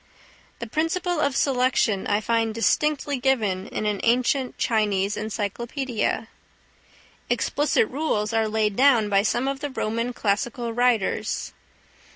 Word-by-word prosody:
The 235 Hz, -, -5 dB
principle 330 Hz, -, -1 dB
of 280 Hz, -3 st, +1 dB
selection 250 Hz, -7 st, +1 dB
I 205 Hz, +1 st, +1 dB
find 225 Hz, 0 st, 0 dB
distinctly 285 Hz, +5 st, +1 dB
given 215 Hz, -8 st, 0 dB
in 215 Hz, -, -4 dB
an 210 Hz, -2 st, 0 dB
ancient 250 Hz, +2 st, +1 dB
Chinese 210 Hz, -3 st, +1 dB
encyclopædia. 225 Hz, +4 st, -2 dB, 1.0 s
Explicit 290 Hz, -6 st, +1 dB
rules 250 Hz, -7 st, -1 dB
are 225 Hz, -1 st, +2 dB
laid 215 Hz, -1 st, 0 dB
down 245 Hz, -5 st, +4 dB
by 200 Hz, -1 st, +4 dB
some 240 Hz, +5 st, 0 dB
of 275 Hz, 0 st, -2 dB
the 290 Hz, -, -4 dB
Roman 230 Hz, -1 st, -2 dB
classical 230 Hz, +2 st, -2 dB
writers. 245 Hz, -4 st, 0 dB
235 Hz, 125 wpm, -24 LUFS, 215-265 Hz, 1.0 s, down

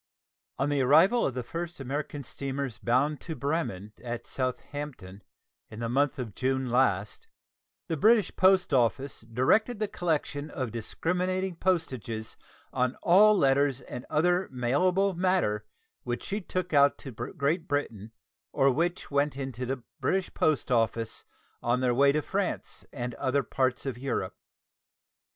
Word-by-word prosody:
On 135 Hz, -, 0 dB
the 145 Hz, -1 st, +1 dB
arrival 160 Hz, -, +5 dB
of 130 Hz, -, -4 dB
the 125 Hz, -, -2 dB
first 170 Hz, +6 st, -5 dB
of -, -, -17 dB
the 135 Hz, -, -7 dB
American 145 Hz, +2 st, -4 dB
steamers 135 Hz, -1 st, -4 dB
bound 135 Hz, +5 st, +1 dB
to 160 Hz, -, -5 dB
Bremen 140 Hz, -, -2 dB
at 120 Hz, -1 st, -5 dB
Southampton, 130 Hz, -6 st, -5 dB, 0.5 s
in 110 Hz, -, -9 dB
the 115 Hz, -, -2 dB
month 145 Hz, +3 st, +1 dB
of 120 Hz, -6 st, -5 dB
June 130 Hz, 0 st, -1 dB
last, 105 Hz, -6 st, +1 dB, 0.6 s
the 165 Hz, -, -1 dB
British 215 Hz, +7 st, +4 dB
post 185 Hz, -4 st, +4 dB
office 135 Hz, +2 st, +1 dB
directed 130 Hz, -, +2 dB
the 215 Hz, 0 st, -1 dB
collection 155 Hz, -5 st, -2 dB
of 130 Hz, -5 st, -4 dB
discriminating 180 Hz, -, -2 dB
postages 130 Hz, -, -2 dB, 0.4 s
on 125 Hz, -1 st, +1 dB
all 205 Hz, +4 st, +6 dB
letters 140 Hz, -3 st, +3 dB
and 125 Hz, 0 st, -8 dB
other 180 Hz, +4 st, +2 dB
mailable 180 Hz, +11 st, +2 dB
matter 170 Hz, -, +1 dB, 0.3 s
which 120 Hz, -1 st, -4 dB
she 205 Hz, +2 st, -3 dB
took 180 Hz, -1 st, -3 dB
out 140 Hz, -1 st, +5 dB
to 135 Hz, -, -9 dB
Great 155 Hz, -, -2 dB
Britain 115 Hz, -7 st, -2 dB, 0.4 s
or 135 Hz, 0 st, +3 dB
which 170 Hz, +6 st, -1 dB
went 140 Hz, 0 st, +1 dB
into 130 Hz, -2 st, -4 dB
the 130 Hz, -1 st, -3 dB, 0.2 s
British 190 Hz, -1 st, 0 dB
post 155 Hz, -3 st, +1 dB
office 115 Hz, -1 st, 0 dB, 0.4 s
on 120 Hz, +1 st, +1 dB
their 125 Hz, -1 st, +2 dB
way 140 Hz, +3 st, +5 dB
to 150 Hz, +1 st, 0 dB
France -, -, -3 dB
and 120 Hz, 0 st, -4 dB
other 135 Hz, +4 st, 0 dB
parts 130 Hz, +2 st, -1 dB
of 130 Hz, -3 st, -4 dB
Europe. 125 Hz, -8 st, -2 dB
140 Hz, 150 wpm, -28 LUFS, 125-165 Hz, 0.6 s, all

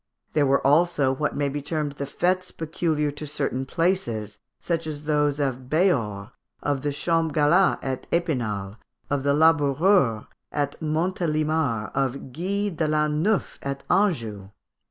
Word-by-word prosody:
There 150 Hz, -2 st, +3 dB
were 135 Hz, +1 st, +2 dB
also 145 Hz, -2 st, +3 dB
what 150 Hz, +3 st, -2 dB
may 145 Hz, 0 st, 0 dB
be 145 Hz, +1 st, -3 dB
termed 150 Hz, 0 st, -2 dB
the 140 Hz, 0 st, -5 dB
fêtes 185 Hz, +5 st, -1 dB
peculiar 155 Hz, -2 st, -1 dB
to 150 Hz, +1 st, -7 dB
certain 140 Hz, -3 st, -2 dB
places, 120 Hz, -, -1 dB, 0.2 s
such 165 Hz, -2 st, -2 dB
as 150 Hz, -1 st, -5 dB
those 150 Hz, -1 st, +1 dB
of 130 Hz, -3 st, -2 dB
Béhors, 120 Hz, -, +1 dB, 0.3 s
of 145 Hz, -2 st, 0 dB
the 145 Hz, +1 st, -1 dB
Champs 165 Hz, +1 st, 0 dB
Galat 165 Hz, +6 st, +4 dB
at 130 Hz, -1 st, -4 dB
Epinal, 115 Hz, -, -1 dB, 0.3 s
of 145 Hz, -1 st, +1 dB
the 140 Hz, +1 st, +2 dB
Laboureurs 145 Hz, -, +3 dB, 0.3 s
at 145 Hz, -1 st, -1 dB
Montélimar, 155 Hz, -, 0 dB
of 135 Hz, -1 st, -2 dB
Guy 200 Hz, +5 st, -1 dB
l'an 150 Hz, 0 st, +1 dB
neuf 210 Hz, +3 st, 0 dB
at 140 Hz, 0 st, -4 dB
Anjou. 115 Hz, -, +1 dB
150 Hz, 140 wpm, -25 LUFS, 135-165 Hz, 0.3 s, Galat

